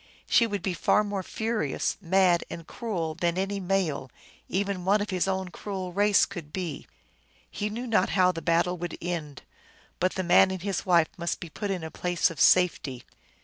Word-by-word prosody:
She 230 - +4
would 205 -2 -4
be 190 - -1
far 210 +5 +3
more 205 -2 -3
furious, 220 +4 -2
mad, 185 -1 +3
and 165 - -7
cruel 180 -10 -3
than 170 +2 -1
any 195 +1 -1
male, 180 -8 -1 0.4
even 195 -1 -1
one 200 +3 +3
of 205 0 -3
his 185 0 0
own 190 -1 -1
cruel 185 -1 -6
race, 205 +1 +4
could 170 -7 -9
be. 170 -5 -5 0.6
He 210 - -3
knew 235 +4 -5
not 215 -6 +2
how 185 -1 +5
the 165 -2 -6
battle 170 +2 +1
would 175 -1 -5
end; 160 -6 -5 0.6
but 185 +1 +1
the 185 - -1
man 180 +2 +6
and 190 -2 -5
his 195 -1 -2
wife 170 -3 +4
must 170 0 -2
be 170 - -8
put 205 - -4
in 185 -4 -2
a 160 - -6
place 175 -1 0
of 160 - -5
safety. 150 -8 +3
185 Hz, 190 wpm, -27 LUFS, 170-200 Hz, 0.6 s, man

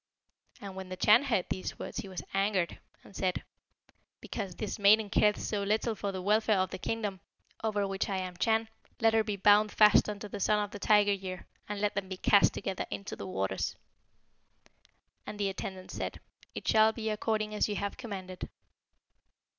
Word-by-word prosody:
"And 195 -2 -8
when 190 -1 -7
the 185 - -4
Chan 220 +8 +5
heard 225 -9 +1
these 185 - -4
words, - - -7
he - - -5
was 185 -2 -6
angered, 195 -3 0 0.2
and 195 - -16
said, 185 -2 -1 0.8
'Because 195 -5 -5
this 210 -1 -4
maiden 205 +1 +5
careth 210 -1 +3
so 205 -2 -2
little 215 +3 0
for 200 -1 -3
the 185 -1 -5
welfare 215 +1 +3
of 185 0 0
the - - -5
kingdom, 205 -2 -3 0.4
over 205 -2 0
which 195 +1 -2
I 195 - -1
am 185 -1 -4
Chan, 225 +3 +2 0.3
let 225 -1 +4
her 220 0 +4
be 210 -1 -2
bound 205 +2 +5
fast 210 0 +5
unto 210 0 -5
the 205 - -6
Son 210 +2 +3
of 205 -1 -2
the 205 - -7
Tiger 205 0 +4
year, 185 -2 -6 0.2
and 210 -1 -3
let 205 0 0
them 200 -2 -3
be 190 - -5
cast 200 +1 +5
together 195 -2 -3
into 200 - -5
the - - -7
waters.' 95 - -2 1.5
And 210 - -7
the 200 -1 +1
attendants 190 -1 -6
said, - - -4 0.4
'It - - -6
shall 220 0 +5
be 220 -1 -3
according 215 0 -1
as 210 - +1
you 205 - -2
have 200 0 -3
commanded.' 190 -7 -7
205 Hz, 190 wpm, -30 LUFS, 190-215 Hz, 1.5 s, Chan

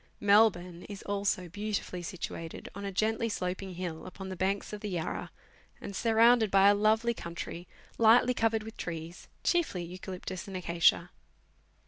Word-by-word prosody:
Melbourne 200 -4 +3
is 200 -1 -7
also 200 -2 -1
beautifully 205 -1 -3
situated 165 -1 -6
on 200 +1 -6
a 200 - -3
geutly 220 +4 0
sloping 185 -1 -3
hill, 175 -2 -5
upon 190 +1 -8
the 190 - -5
banks 195 +3 -1
of 210 - -6
the 210 - -4
Yarra, 175 -4 -3 0.5
and 200 - -7
surrounded 230 +1 +4
by 195 +1 +6
a - - +6
lovely 220 +3 +2
country, 170 -2 -7 0.3
lightly 235 +2 +6
covered 225 -2 +1
with 220 +1 -9
trees, 165 0 -6 0.2
chiefly 330 - +1
eucalyptus 185 +1 -7
and 190 -1 -5
acacia. 170 -2 +2
195 Hz, 150 wpm, -30 LUFS, 180-220 Hz, 0.5 s, by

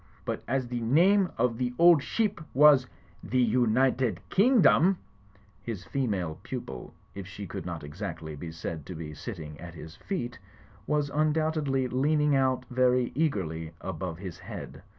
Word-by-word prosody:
But - - -3
as 130 +1 0
the 120 0 -3
name 180 - +4
of 115 -1 +1
the 125 -1 -1 0.2
ship 205 +6 -1
was 140 -2 +7 0.4
The 130 - -2
United 125 -2 +2
King 245 +5 +5
dom—' 185 +3 +5 0.3
" 100 0 -31
His 110 -5 -5
female 95 - -2
pupil, 100 - -7 0.2
if 100 -2 -7
she 100 +1 -7
could 90 - -6
not 85 -3 -5
exactly 80 0 -6
be 80 +3 -7
said 80 -1 -5
to 90 - -6
be 80 -1 -6
sitting 75 -5 -7
at 85 -1 -9
his 80 0 -10
feet, 125 -12 -4 0.5
was 150 -1 0
imdoubtedly 155 -3 +1
leaning 150 +3 +2
out 130 -1 +1
very 125 0 +2
eagerly 85 - -1
above 90 -3 -4
his 90 -2 -8
head. - - -8
120 Hz, 150 wpm, -28 LUFS, 90-140 Hz, 0.5 s, was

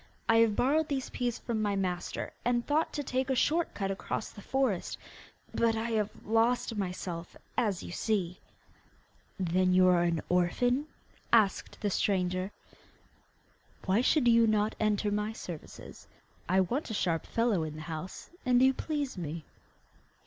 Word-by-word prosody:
I 225 - +5
have 225 -2 +4
borrowed 300 +7 +2
these 270 -3 -3
peas 245 -2 -1
from 225 -3 -2
my 205 -1 +1
master, 180 -2 -2
and 240 0 +1
thought 305 +2 +1
to 290 - -2
take 260 0 -1
a 265 - +2
short 320 +7 +1
cut 195 -2 -1
across 195 +2 -4
the 205 - -11
forest; 260 -6 0 0.6
but 230 -1 +2
I 225 +1 -2
have 215 -2 +1 0.2
lost 230 +1 +2
myself, 180 -3 -4 0.2
as 210 -7 0
you - - -7
see.' 185 -3 -1 1.0
'Then 185 0 +2
you 185 0 +6
are 175 -1 +4
an 170 -2 +1
orphan?' 245 - +2 0.4
asked 215 -4 +2
the 205 - 0
stranger. 185 0 0 1.3
'Why 195 +4 +3
should 260 0 +3
you 230 -1 +6
not 215 0 +2
enter 210 -1 +1
my 210 +1 -1
service? 175 -7 -9 0.4
I 190 +1 +4
want 245 - -1
a 220 - -3
sharp 165 -4 0
fellow 230 -6 +1
in 155 -1 -4
the 155 - -7
house, 160 +3 -7
and 250 -1 +4
you 265 +1 +5
please 285 -6 -3
me. 160 -1 -5
210 Hz, 155 wpm, -30 LUFS, 185-245 Hz, 1.3 s, you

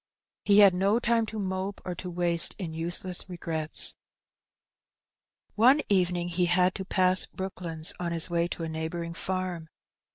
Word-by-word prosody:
He 200 -1 +4
had 200 -2 +7
no 195 +4 +2
time 235 -1 +1
to 220 - -6
mope 190 0 -3
or 180 - -3
to 180 +1 -7
waste 170 -1 +2
in 175 -6 -5
useless 175 +3 -4
regrets. 160 -3 0 1.6
One 255 +7 +5
evening 180 -3 +1
he 175 +1 +1
had 180 +1 +2
to 190 - -5
pass 185 0 +2
Brooklands 175 -4 -3
on 175 -1 -3
his 165 -1 0
way 170 -1 0
to 170 - -6
a - - -3
neighbouring 160 +1 -4
farm. 180 -2 -4
180 Hz, 155 wpm, -27 LUFS, 170-190 Hz, 1.6 s, had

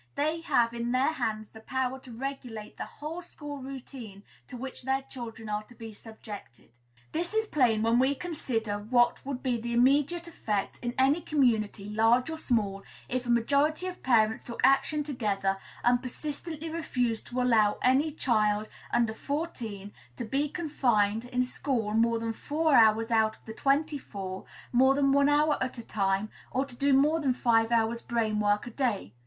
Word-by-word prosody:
They 310 +3 0
have 235 -7 +2
in 235 0 -2
their 265 +5 +2
hands 215 -7 -3
the 220 - -12
power 260 +3 -2
to 260 -1 -13
regulate 240 -3 -6
the - - -5
whole 315 +4 -7
school 295 -4 -8
routine 255 -6 -9 0.2
to 250 - -8
which 260 +1 -7
their 265 +1 0
children 235 -4 -8
are 210 0 -1
to 240 - -17
be 225 -1 -9
subjected. 205 - -11 0.4
This 345 +6 -2
is 440 0 +2
plain, 245 - +2
when 230 +1 +3
we 260 - +4
once - - -12
consider 225 -11 -2
what 240 +3 +2
would 270 -2 -5
be 245 -4 0
the 235 +1 -3
immediate 285 +8 +3
effect 210 -11 -3
in 240 0 -3
any 275 +5 +3
community, 225 -9 +1
large 225 +6 +3
or 320 - -5
small, 205 -8 0 0.3
if 250 0 -2
a - - -4
majority 280 +8 +2
of 365 -1 -6
parents 220 -3 +3
took 235 - -9
action 275 +3 +3
together, 200 -8 -1 0.2
and 245 0 +3
persistently 305 +4 -5
refused 250 -8 -2
to 250 - -3
allow 225 -4 +3
any 265 +5 +4
child 215 -7 +1 0.2
under 235 -2 +2
fourteen 225 - -4 0.2
to 240 - -4
be 280 +6 0
confined 240 - +1
in 250 0 0
school 250 -4 -2
more 230 +1 +3
than 225 0 -2
four 310 +6 0
hours 225 -1 +5
out 220 -1 +2
of - - -30
the 220 - -7
twenty 290 +4 +1
four, 190 -5 -7 0.3
more 265 +2 +5
than 275 -1 +3
one 280 +1 +4
hour 295 +1 +3
at 255 0 -4
a 235 - -7
time, 195 0 -1 0.2
or 265 +2 0
to 260 -3 -10
do 280 +3 +1
more 295 +4 +4
than 275 -4 +1
five 230 -2 +2
hours' 230 0 +1
brain 220 -3 -1
work 205 0 +1
in 240 - -8
a - - -29
day. 225 - -1
245 Hz, 185 wpm, -29 LUFS, 220-280 Hz, 0.4 s, hours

